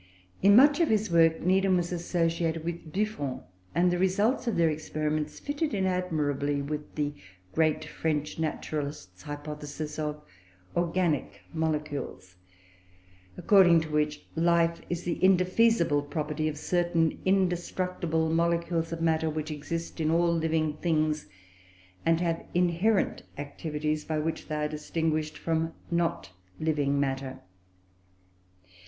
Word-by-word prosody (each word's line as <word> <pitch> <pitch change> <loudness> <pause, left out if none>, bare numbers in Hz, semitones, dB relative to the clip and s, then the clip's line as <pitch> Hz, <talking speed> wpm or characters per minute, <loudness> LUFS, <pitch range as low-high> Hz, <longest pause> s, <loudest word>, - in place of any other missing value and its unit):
In 200 +1 +7
much 285 +6 +7
of 335 - +3
his 215 -3 +1
work 165 -1 +4
Needham 190 +1 +3
was 175 0 -1
associated 165 -2 0
with 170 -1 -5
Buffon, 190 -9 -2 0.3
and 175 +1 +4
the 175 - 0
results 205 +8 +1
of 235 - +1
their 170 -1 +4
experiments 155 -1 -2
fitted 290 -2 -2
in 190 -1 +1
admirably 150 -6 0
with 150 +1 -5
the 145 -1 -1 0.4
great 155 -1 +2
French 150 0 -2
naturalist's 145 - -4
hypothesis 150 +2 -6
of 150 -1 -2 0.6
"organic 170 -3 0
molecules," 150 - -3 1.0
according 180 -5 +6
to 160 -1 -6
which, 150 0 0
life 170 0 +2
is 175 0 -2
the 175 +1 -3
indefeasible 185 -3 +4
property 150 +1 -2
of 150 -1 -3
certain 170 0 +1
indestructible 180 -3 0
molecules 170 0 +1
of 165 0 -4
matter, 160 -1 +2
which 155 0 -3
exist 165 +3 -5
in 155 - +1
all 170 +1 +3
living 160 -2 0
things, 155 - 0 0.8
and 165 0 +4
have 165 -2 -1
inherent 180 +4 +2 0.2
activities 150 +1 -3
by 155 - -2
which 160 +1 -3
they 155 - -3
are 150 0 0
distinguished 155 0 -2
from 165 0 -1 0.2
not 170 - 0 0.3
living 145 -3 +1
matter. 135 -1 -2
160 Hz, 125 wpm, -28 LUFS, 150-175 Hz, 1.0 s, In